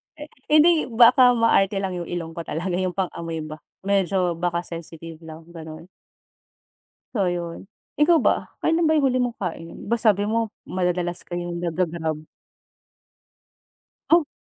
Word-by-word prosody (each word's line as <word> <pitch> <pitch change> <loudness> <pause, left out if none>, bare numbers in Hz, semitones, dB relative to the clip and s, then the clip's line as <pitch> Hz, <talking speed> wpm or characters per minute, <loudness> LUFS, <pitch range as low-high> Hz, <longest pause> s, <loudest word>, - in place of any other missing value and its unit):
Eh 300 -1 -10 0.2
hindi, 310 +1 +5
baka 245 +1 +6
maarte 205 -4 +3
lang 190 -1 -2
yung 170 - -6
ilong 170 -2 -4
ko - - -2
talaga 175 +4 -3
yung 185 -1 -2
pang-amoy 165 -4 -3
ba, 155 0 -8 0.2
medyo 190 -2 +1
baka 170 0 -1
sensitive 165 -1 -9
lang 160 0 -10
ganon. 160 0 -10 1.3
So 205 - +2
ayun, 175 +1 -4 0.2
ikaw 315 +2 +4
ba? - - 0
Kailan 325 +1 +1
ba 315 - +3
yung 275 - +2
huli 255 -1 +1
mong 240 -1 -4
kain, 165 -3 -5
ba 235 - +2
sabi 210 -3 +2
mo 225 -1 0 0.2
madadalas 180 -1 -1
kayong 175 0 -5
naga-grab? 160 -2 -2 1.9
Oh. 335 -2 +5
180 Hz, 140 wpm, -23 LUFS, 170-230 Hz, 1.9 s, baka